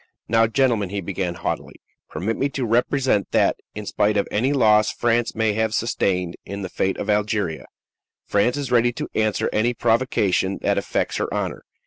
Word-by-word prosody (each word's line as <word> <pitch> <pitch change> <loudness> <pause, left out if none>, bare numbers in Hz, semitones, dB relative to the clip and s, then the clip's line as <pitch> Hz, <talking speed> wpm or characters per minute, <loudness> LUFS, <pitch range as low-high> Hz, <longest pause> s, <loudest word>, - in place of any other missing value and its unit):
"Now, 115 0 +4
gentlemen," 115 -5 +1
he 100 +1 -3
began 90 -1 -3
haughtily, 85 - -4 0.3
"permit 100 +9 -2
me 140 - 0
to 130 - 0
represent 120 -2 +1
that, - - +3 0.2
in 105 0 -6
spite 105 +1 +1
of 100 - +1
any 125 +6 +1
loss 110 -6 +4
France 120 -1 0
may 110 -1 +1
have 110 +1 0
sustained 90 -6 -1
in 100 0 -6
the 95 - -4
fate 95 +1 -1
of - - -4
Algeria, 105 -5 -1 0.6
France 120 +7 +1
is 140 -3 -4
ready 120 0 +4
to - - -4
answer 110 -1 +1
any 120 +3 +1
provocation 110 -6 +1
that - - +2
affects - - -2
her - - -2
honor. - - -3
110 Hz, 175 wpm, -22 LUFS, 100-120 Hz, 0.6 s, Now